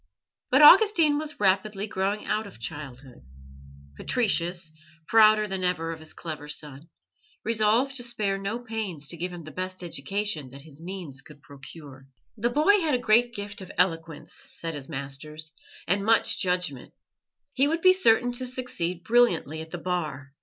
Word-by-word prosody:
But 265 +4 +5
Augustine 330 -4 +7
was 305 -1 -7
rapidly 200 +1 +1
growing 200 0 -2
out 215 0 -1
of 190 - -14
childhood. 130 0 -8 0.7
Patricius, 175 - 0 0.4
prouder 215 -1 +5
than 190 -2 -4
ever 165 -2 0
of 165 - -7
his 155 0 -8
clever 155 -3 -7
son, 150 +1 -7 0.5
resolved 230 +4 +2
to 245 - -2
spare 210 -5 -1
no 200 +4 -3
pains 220 -11 -5
to - - -2
give 180 +2 -4
him 175 -2 -9
the 155 - -10
best 185 +1 -5
education 170 -1 -3
that 135 +2 -12
his 155 -1 -13
means 170 -7 -7
could 150 -2 -17
procure. 140 -1 -12 0.3
The 235 +3 0
boy 310 +11 +4
had 315 -6 +1
a - - +2
great 240 +1 +2
gift 205 0 -6
of 185 - -9
eloquence, 165 -3 -1
said 165 -1 -5
his 145 -1 -8
masters, 150 +2 -6 0.3
and 195 +3 +1
much 225 +1 +3
judgment; 180 -8 -1 0.6
he 275 +2 +3
would 325 +3 -1
be 370 0 +8
certain 245 -9 +3
to 250 +1 -3
succeed 185 -9 -3
brilliantly 180 - +2
at 160 - -9
the 175 - -6
Bar. 155 -6 -4
185 Hz, 165 wpm, -26 LUFS, 155-225 Hz, 0.7 s, be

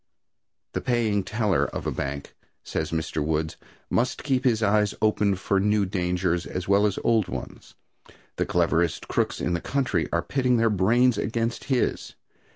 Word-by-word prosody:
The - - -2
paying 110 -5 +1
teller 105 -2 +1
of - - -5
a - - 0
bank, 70 +1 -5 0.3
says 80 -1 -3
Mr. 80 -2 -2
Woods, 80 0 -1 0.3
must 120 +2 0
keep 130 -3 0
his 115 -3 +2
eyes 105 -1 +2
open 105 -2 +2
for 95 +1 0
new 105 0 +2
dangers 90 -2 -1
as 90 -1 -5
well 100 +2 +4
as 100 - -3
old 110 -4 +2
ones. - - -8 0.6
The - - 0
cleverest 85 -2 +1
crooks - - -1
in 90 - -1
the 85 - -1
country 130 -12 0
are 85 +1 0
pitting 130 -3 +1
their 115 -1 +3
brains 115 +6 +3
against 115 +2 -2
his. 130 -3 -1
100 Hz, 165 wpm, -25 LUFS, 85-115 Hz, 0.6 s, well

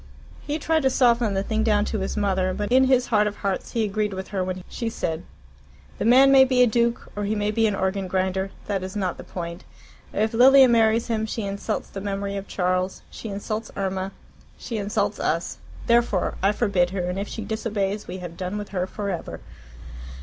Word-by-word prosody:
He 295 +1 -3
tried 320 +1 +1
to 265 - +3
soften 235 -5 +3
the 195 - 0
thing 220 +1 -1
down 210 -2 +2
to 215 - -2
his 195 +3 -3
mother, 190 -2 +1
but 205 +2 -3
in 260 +1 +6
his 255 -1 +3
heart 210 -1 +4
of 210 - -3
hearts 195 -2 -3
he 230 - +1
agreed 210 -1 -1
with 190 0 -6
her 195 -3 -1
when 185 0 -4
she 230 - -3
said, 165 -7 -3 0.8
"The - - -1
man 260 +4 +7
may 270 -1 +8
be 255 -1 +4
a - - +7
duke 235 0 0
or 205 - -3
he 210 +2 0
may 205 0 0
be 225 +1 +2
an 210 - 0
organ 190 0 -1
grinder. 190 +1 -1 0.2
That 200 -2 -1
is 185 +1 -6
not 190 -4 -1
the - - -8
point. 170 -1 -6 0.5
If 220 +2 0
Lilia 265 +3 +8
marries 230 -1 +3
him 220 -2 -1
she 220 0 -3
insults 200 0 -3
the 195 - -7
memory 200 0 -3
of 195 0 -5
Charles, 185 0 -1
she 225 - -7
insults 215 +2 -4
Irma, 190 -1 -2 0.5
she 230 - -5
insults 205 +1 -1
us. - - -1 0.3
Therefore 235 -5 +2
I 195 +2 +4
forbid 200 -5 +1
her, 190 0 -3
and 180 +2 -2
if 200 - -3
she 220 - -6
disobeys 210 -2 -2
we 180 - -5
have 175 -2 -8
done 185 +3 -4
with 205 -1 -6
her 185 -2 -2
for 200 0 -4
ever." 175 - -5
205 Hz, 215 wpm, -24 LUFS, 190-225 Hz, 0.8 s, may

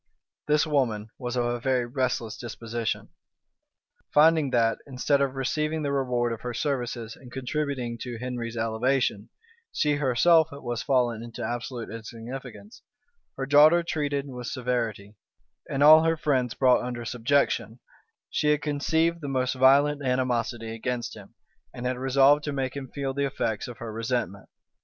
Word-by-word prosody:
This 150 0 +3
woman 115 -8 0
was 125 -1 -4
of 120 -1 +1
a 120 0 -1
very 125 0 +1
restless 120 -3 -2
disposition. 115 -1 -4 1.0
Finding 155 -1 +5
that, 115 -3 +2
instead 140 +1 +1
of 135 -1 0
receiving 150 +4 -1
the 140 - -1
reward 125 -4 0
of 115 - -8
her 125 -1 -5
services 120 -5 -3
in 125 - -14
contributing 130 -2 -3
to 120 -2 -5
Henry's 120 -1 -5
elevation, 115 -1 0 0.4
she 150 -1 +1
herself 150 +4 +4
was 120 -4 -4
fallen 120 -4 +1
into 115 -1 -7
absolute 120 0 -5
insignificance, 120 - -9 0.6
her 135 - -2
daughter 150 +5 +6
treated 145 -4 -2
with 125 -3 -7
severity, 115 -5 -3 0.5
and 140 +1 +1
all 155 +1 +9
her 165 0 +1
friends 130 -6 0
brought 130 -2 +4
under 120 -1 -5
subjection, 125 -1 0 0.5
she 150 - 0
had 150 -1 +2
conceived 160 +3 0
the 145 - -5
most 130 -2 0
violent 140 +3 +4
animosity 120 -3 -1
against 120 +1 -3
him, - - -14 0.4
and 120 - -6
had 125 0 -1
resolved 135 +3 +4
to 145 - -2
make 135 -2 -3
him 140 -2 -5
feel 135 +1 -4
the 140 +1 0
effects 110 -5 -2
of 120 -2 -9
her 115 -2 -7
resentment. 115 -4 -3
130 Hz, 150 wpm, -26 LUFS, 120-140 Hz, 1.0 s, all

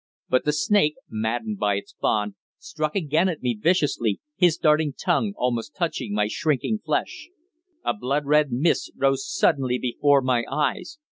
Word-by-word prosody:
But 130 - +2
the 150 - +3
snake, 155 -1 +2 0.2
maddened 110 -1 -2
by 105 -1 +1
its 100 - -6
bond, 105 -1 0 0.2
struck 155 -1 -4
again 165 0 +1
at 160 -6 -5
me 125 -1 +1
viciously, 120 - +1 0.2
his 175 -2 +3
darting 150 -1 +2
tongue 190 +7 0
almost 125 +3 -2
touching 160 - -2
my 105 0 +2
shrinking 155 - -1
flesh. - - -2 0.6
A - - +1
blood 145 - -2
red 150 -1 +3
mist 140 +8 +1
rose 135 0 0
suddenly 130 -3 +2
before 140 +3 +2
my 125 -2 +1
eyes. 150 - -2
140 Hz, 155 wpm, -24 LUFS, 120-155 Hz, 0.6 s, the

